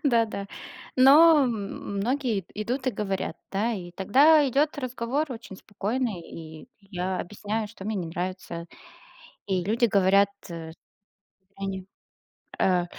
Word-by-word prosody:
Да 235 -4 +4
да. 200 -2 -5 0.5
Но 300 +6 +8
м - - +1 0.5
многие 240 -1 0
ид 175 - -22
идут 245 +6 -3
и 255 - +4
говорят, 195 -6 -3 0.2
да. 220 +5 +1
И 175 -4 -6
тогда 285 - +5
идёт 290 +4 +1
разговор 255 +3 -2
очень 225 -5 -9
спокойный, 215 0 -3
и 160 +3 -10
я 185 -1 -3
объясняю, 210 +3 -4
что 205 -2 -11
мне 215 +1 -2
не 175 -3 -2
нравится. 175 -1 -5 0.8
И 185 -3 0
люди 225 +5 +2
говорят, 200 -1 +4 0.2
э 165 -1 -7 0.8
они 195 -1 -4 0.7
э 180 -2 +3
205 Hz, 135 wpm, -26 LUFS, 185-245 Hz, 0.8 s, Но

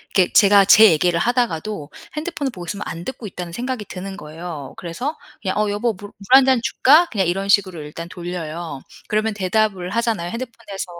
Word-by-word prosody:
이렇게 185 -3 +4
제가 200 -1 +6
제 215 +1 +8
얘기를 170 +2 +2
하다가도 215 - -1 0.2
핸드폰을 300 -4 -3
보고 175 -4 -9
있으면 205 +2 -5
'안 170 +1 -6
듣고 245 -4 -6
있다.'는 180 -2 -7
생각이 245 -2 -4
드는 195 +1 -7
거예요. 155 -3 -8
그래서 245 - -4 0.3
그냥 190 -1 -2
"어 210 -1 +1
여보 215 +3 0
물 205 +2 -10
물 210 +7 +5
1 270 - +5
잔 260 -2 +4
줄까?" 295 +5 +5
그냥 195 -6 0
이런 195 +3 -2
식으로 185 -5 +2
일단 160 +3 -8
돌려요. 170 -4 -6 0.3
그러면 215 +1 0
대답을 195 -2 0
하잖아요. 220 -6 -1
핸드폰에서 230 -5 -6
200 Hz, 415 characters per minute, -21 LUFS, 175-230 Hz, 0.3 s, 제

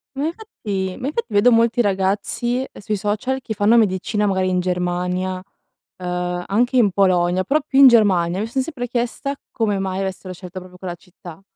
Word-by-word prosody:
Ma 280 - -1
infatti 210 - -4
ma 255 - -3
infatti 370 +11 -2
vedo 205 +5 +5
molti 230 +1 +3
ragazzi, 205 +6 0
sui 210 +1 -2
social, 210 +7 -2
che 220 - -4
fanno 210 +3 +3
medicina 210 0 +1
magari 190 -2 +1
in 185 0 +1
Germania, 180 +1 -1 0.6
uhm, 180 0 -3
anche 245 +6 +1
in 215 -5 +5
Polonia, 185 -1 +2
però 295 +10 +2
più 270 -3 0
in 275 - +10
Germania 190 -7 +3
mi 215 - -1
son 260 +3 -1
sempre 255 -4 -5
chiesta 245 +4 -2 0.2
come 210 -4 0
mai 190 0 -2
avessero 190 -1 -4
scelto 180 +1 -9
proprio 180 0 -12
quella 180 -2 -6
città. 175 -1 -13
200 Hz, 175 wpm, -20 LUFS, 185-240 Hz, 0.6 s, in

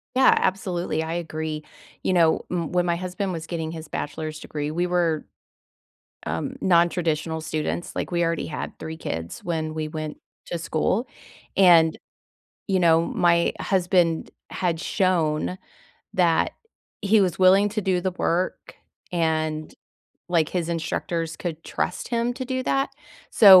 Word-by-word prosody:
Yeah, 260 0 +7
absolutely, 180 -4 -1
I 160 +1 -3
agree. 160 -2 -3 0.4
You - - +1
know, 165 -3 +4
m 170 -3 -2
when 180 0 +2
my 170 -1 +1
husband 185 +2 -3
was 165 -2 -5
getting 160 -2 -3
his 160 -1 -7
bachelor's 155 +1 -4
degree, 150 -1 -4
we 175 +3 0
were, 170 -3 +1 1.0
um, - - -3
nontraditional 170 -3 +2
students, 155 +2 -3
like, - - -3
we 175 0 +2
already 165 -1 -1
had 150 - -5
3 160 0 -6
kids 80 - -5
when 160 -2 -2
we 155 -1 -3
went 155 -1 -5 0.3
to 175 - -2
school, 170 +8 0 0.5
and, 170 -4 +6 0.7
you 190 -2 +2
know, 165 -1 +5
my 170 0 +3
husband 180 -3 +2 0.2
had 170 -3 -1
shown 180 -2 +1 0.6
that 170 -3 +3 0.5
he 210 +1 +4
was 180 -3 0
willing 190 +2 +6
to 215 +1 -1
do 185 -2 +1
the 185 - +1
work 180 0 -1 0.4
and, 155 -2 0 0.5
like, 165 -3 +2
his 175 -3 -2
instructors 165 -1 -2
could 165 -2 -5
trust 180 - -2
him 235 0 0
to 260 - -4
do 260 0 -1
that, 270 +1 +1 0.4
so 195 -4 +10
170 Hz, 145 wpm, -24 LUFS, 160-185 Hz, 1.0 s, so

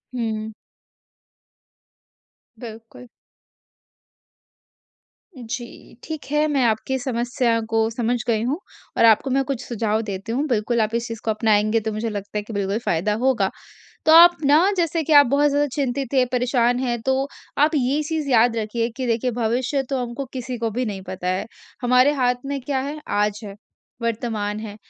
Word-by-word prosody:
हुँ। 220 -2 -3 2.1
बिल्कुल। 225 +1 -11 2.3
जी। 240 0 -8
ठीक 315 -2 -6
है 300 +1 +2
मैं 280 -4 +1
आपकी 230 +4 0
समस्या 240 -1 0
को 225 0 +2
समझ 235 +1 -1
गई 225 -2 +1
हूँ 275 +7 -1 0.4
और - - +5
आपको 225 +4 +4
मैं 270 +1 +2
कुछ 265 -3 -3
सुझाव 220 -2 -1
देती 200 0 -5
हूँ 270 +6 0
बिल्कुल, 235 -1 +1
आप 220 +1 -1
इस 235 +1 -1
चीज़ 230 -1 -7
को 220 - +2
अपनाएँगे 215 0 +2
तो 220 0 -3
मुझे 220 +2 -2
लगता 205 0 -5
है - - 0
कि 220 - -9
बिल्कुल 200 0 -1
फ़ायदा 175 +5 +1
होगा। 235 -8 +2 0.6
तो 315 - +6
आप 345 +1 +9
ना 310 +7 +5
जैसे 335 -2 0
कि 310 +1 -1
आप 285 -1 +8
बहुत 285 +3 +3
ज्यादा 290 +1 +2
चिंतित 275 -1 -2
हैं, 255 -1 +4
परेशान 245 -1 +2
हैं 240 -2 -1
तो, 265 +2 0 0.3
आप 295 +2 +5
ये 280 +2 +1
चीज़ 305 -1 -3
याद 235 -1 +4
रखिए 230 +1 -1
कि 260 - -3
देखिए, 235 +2 0
भविष्य 245 +4 -1
तो 270 - 0
हमको 245 +3 -5
किसी 255 -1 -5
को 225 -1 -1
भी 245 +4 -2
नहीं 200 -3 -5
पता 180 -1 -4
है। 185 +1 -1 0.4
हमारे 250 +3 +4
हाथ 250 -3 +2
में 280 0 -3
क्या 265 +1 -2
है? 285 +3 -5
आज 210 0 0
है, 200 -1 -8 0.5
वर्तमान 220 -3 -2
है। 210 -2 -7
240 Hz, 170 wpm, -22 LUFS, 220-270 Hz, 2.3 s, आप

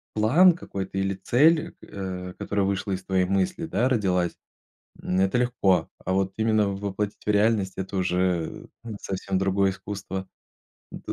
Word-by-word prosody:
план 155 +13 +6
какой-то 95 - -6
или 95 0 0
цель, 155 - +3 0.2
а, 90 -2 -5
которая 100 +1 -1
вышла 100 0 -1
из 95 0 -3
твоей 95 -1 +1
мысли, 95 - 0
да, 130 -5 +1
родилась, 95 -8 +1 0.7
м, 90 +1 -1
это 95 +5 +2
легко, 100 -9 +2 0.2
а 95 - -1
вот 95 0 +1
именно 110 -2 +2
воплотить 100 +1 -4
в - - -4
реальность- 105 -2 +2
это 95 +1 -4
уже, 90 -2 -1 0.2
э, - - -8
совсем 95 0 -2
другое 95 0 +2
искусство, 95 -1 -6 0.6
да. - - -6
95 Hz, 150 wpm, -25 LUFS, 95-105 Hz, 0.7 s, план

